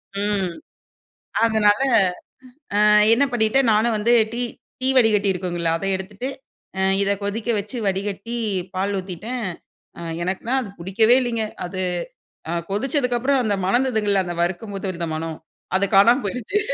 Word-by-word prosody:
ம். 200 -3 -1 0.9
அதனால, 215 -2 +3 1.0
அ - - +5 0.3
என்ன 260 - +3
பண்ணிட்டேன்? 240 +2 +2
நானும் 220 +2 +2
வந்து 225 +3 +2 0.2
டீ 240 - -3 0.4
டீ 260 - +2
வடிகட்டி 210 -4 +4
இருக்குங்களா? 175 -2 -2
அத 195 - -5
எடுத்துட்டு, 200 +6 -6 0.5
அ - - +1 0.2
இத 200 0 +1
கொதிக்க 215 +3 -3
வச்சு, 210 +5 -6
வடிகட்டி, 200 +4 -3 0.4
பால் 195 +2 -1
ஊத்திட்டேன். 210 +6 -5 0.5
அ - - -7 0.2
எனக்குன்னா 190 +8 -2
அது 210 - -7
பிடிக்கவே 220 +7 +4
இல்லைங்க. 230 -3 -1 0.2
அது 185 +1 -6 0.7
அ - - -1 0.2
கொதிச்சதுக்கு 250 +3 0
அப்புறம், 270 +1 +2
அந்த 205 -3 0
மணந்ததுங்கல்ல, 210 -3 +1
அந்த 175 -1 -4
வறுக்கும்போது 195 +3 -4
இருந்த 170 -1 -4
மணம், 160 0 -4 0.4
அது 200 - +1
காணாம 235 +7 +6
போயிடுச்சு. 250 - -2
210 Hz, 135 wpm, -22 LUFS, 190-235 Hz, 1.0 s, காணாம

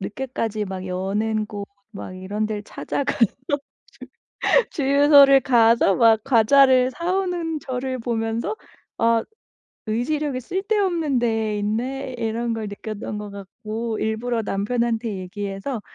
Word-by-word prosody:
늦게까지 225 -1 -3
막 190 -1 -6
여는 210 +4 -1
곳 205 -1 -6 0.3
막 185 - -7
이런 200 +3 -3
데를 210 -1 -4
찾아가서 270 0 0 0.3
주 285 -1 -3 1.0
주유소를 280 -1 +6
가서 230 -5 +4
막 225 -2 +5
과자를 255 +2 +5
사 340 +7 -2
오는 350 -4 -2
저를 260 -1 -3
보면서 225 - -2 0.4
'아 230 0 +3 0.6
의지력이 255 +4 -1
쓸데없는 370 - 0
데 225 -3 0
있네.' 250 +6 -3
이런 230 +1 -2
걸 220 -2 -4
느꼈던 210 +1 -6
것 210 0 -6
같고 215 +3 -5
일부러 225 +2 -1
남편한테 225 +2 -1
얘기해서 200 +5 -5
230 Hz, 255 characters per minute, -23 LUFS, 215-265 Hz, 1.0 s, 주유소를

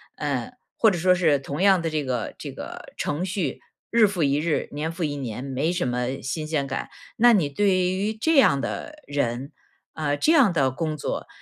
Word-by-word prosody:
呃， 140 - -2 0.2
或 225 - +5
者 190 - -1
说 180 +2 +4
是 165 -5 +3
同 140 +4 -5
样 195 -1 +5
的 165 -1 -2
这 155 -1 -1
个， 125 -4 -3
这 - - -6
个 - - -9
程 150 +4 -2
序， 185 -7 -2 0.3
日 230 -2 +6
复 190 -5 -1
一 140 0 +2
日、 160 0 0
年 150 +3 -3
复 170 +1 -4
一 145 -2 -1
年， 125 -3 -5
没 140 +4 -1
什 175 - -1
么 125 +2 -2
新 155 +4 -3
鲜 155 -3 0
感。 135 0 -4 0.3
那 240 +1 +6
你 180 -9 +3
对 200 +8 +1
于 185 +3 +1
这 320 +8 +1
样 175 - +5
的 300 - -5
人， 135 -1 -2 0.4
呃， 145 -2 -1
这 305 - +3
样 275 - +5
的 135 -6 +2
工 155 +3 -3
作， - - -4
155 Hz, 220 characters per minute, -24 LUFS, 140-185 Hz, 0.4 s, 日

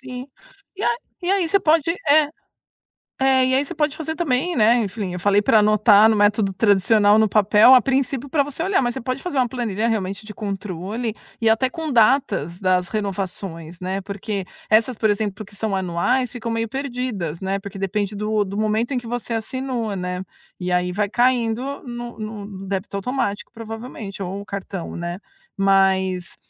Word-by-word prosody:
sim. 255 -1 -7 0.5
E 405 - -6
a 475 - +2 0.3
e 355 - 0
aí 390 -4 +2
você 395 - +4
pode 315 0 +4 0.3
é, 305 +1 +6 1.0
é, 265 -1 +4
e 260 - +2
aí 275 - +2
você - - -7
pode 300 -1 0
fazer 320 0 -4
também, 310 +1 0
né, 225 +1 +5
enfim, 205 -4 -2
eu 180 - -4
falei 205 +2 +3
pra 215 +1 +4
anotar 210 0 +6
no 220 - +3
método 205 -1 +2
tradicional 205 +1 +4
no 220 - +4
papel, 210 +4 +6
a 255 - +8
princípio 270 +1 -1
pra 285 -1 +2
você 290 +3 -6
olhar, 385 +2 +2
mas 240 -1 0
você 265 - -5
pode 255 +3 -4
fazer 355 -7 -3
uma 250 -1 +3
planilha 230 -3 -2
realmente 200 -2 -2
de 210 - -8
controle 205 +2 -4 0.3
e 225 - +4
até 250 +4 +3
com 315 +1 -5
datas 215 - +2
das 185 -2 +1
renovações, 190 -5 -4
né, 190 +2 -3
porque 200 0 -4 0.2
essas, 225 +2 +3
por 220 - +2
exemplo, 205 0 -1
que 205 - -16
são 210 -1 -1
anuais, 190 +8 0
ficam 235 -2 -5
meio 230 0 -1
perdidas, 250 - -3
né, 195 0 -1
porque 195 0 -9
depende 200 +1 -1
do 210 0 0
do 200 +1 -6
momento 215 +4 0
em - - 0
que 235 - -11
você 240 0 -3
assinou, 235 -2 -3
né, 180 0 -3 0.4
e 180 0 -3
aí 180 0 +1
vai 205 +1 -1
caindo 245 +2 +1
no 240 -2 -7
no 215 -1 -6
no 195 -1 -9
débito 200 +1 -3
automático, 205 -1 -2
provavelmente, 225 -3 -8
ou 195 +2 -4
o - - -10
cartão, 195 -2 -6
né? 175 +1 -4 0.4
Mas 190 -2 +2
215 Hz, 190 wpm, -22 LUFS, 195-250 Hz, 1.0 s, a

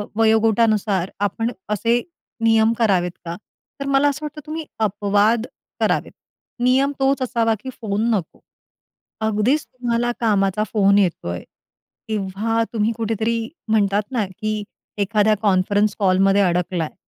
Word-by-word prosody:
वयोगटानुसार 220 -3 +2
आपण 215 +4 -1 0.2
असे 230 +3 +1 0.4
नियम 225 0 +4
करावेत 190 -6 +2
का? 170 0 -4 0.4
तर 275 - -4
मला 275 +1 +3
असं 295 +2 -4
वाटतं, 300 0 -7
तुम्ही 315 +1 -5
अपवाद 210 +2 +2 0.3
करावेत. - - 0 0.5
नियम 265 +3 +3
तोच 270 0 +2
असावा 230 -3 +1
की 260 - -7
फोन 215 +2 0
नको. 180 -6 -5 0.8
अगदीच 220 +7 +1
तुम्हाला 240 -1 -2
कामाचा 205 -2 +2
फोन 200 -2 +4
येतो 180 - 0
आहे, 85 0 -4 0.6
तेव्हा 215 +2 -1
तुम्ही 220 0 +1
कुठेतरी 225 0 -1 0.3
म्हणतात 205 -1 +2
ना, 225 -5 +1
की 215 +2 -4 0.4
एखाद्या 210 +1 +3
कॉन्फरन्स 200 +1 +2
कॉलमध्ये 195 0 +3
अडकला 180 -2 0
आहे 155 - -8
215 Hz, 125 wpm, -21 LUFS, 200-230 Hz, 0.8 s, नियम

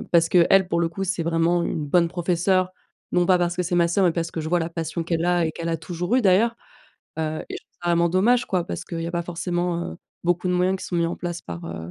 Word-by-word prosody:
heu, - - -8
parce 165 -1 +5
qu'elle, 185 +1 +5
pour 170 0 +1
le 170 - +1
coup, 195 +4 -4
c'est 180 -2 -1
vraiment 170 +1 +2
une 155 - -2
bonne 170 +2 +3
professeure, 180 +2 +1 0.4
non 175 0 +3
pas 185 0 +5
parce 175 0 0
que 180 - 0
c'est 175 +1 -2
ma 170 -1 +3
sœur, 190 +3 +2
mais 170 - +3
parce 165 -1 -2
que 165 - -4
je 155 - -4
vois 175 0 +2
la 165 +1 -3
passion 165 0 -3
qu'elle 165 0 -1
a 175 -1 +2
et - - -1
qu'elle 170 0 -5
a 165 - 0
toujours 175 +7 -2
eu 255 - +2
d'ailleurs, 215 +5 +3 0.6
heu 155 0 -2
et - - -3
je - - -7
trouve - - -51
ça 175 - -2
vraiment 170 0 +3
dommage 230 +7 +3
quoi, 180 -3 0
parce - - -5
qu'il 165 -2 -5
y - - -3
a - - -7
pas 170 0 -1
forcément, 175 0 -2
heu, - - -10 0.3
beaucoup 175 +1 +1
de - - +1
moyens 185 +1 +1
qui - - -7
sont 180 - -5
mis 170 - +2
en 170 - -3
place 175 -1 -5
par, 85 -1 -7
heu, 80 +1 -7
175 Hz, 290 wpm, -24 LUFS, 165-180 Hz, 0.6 s, parce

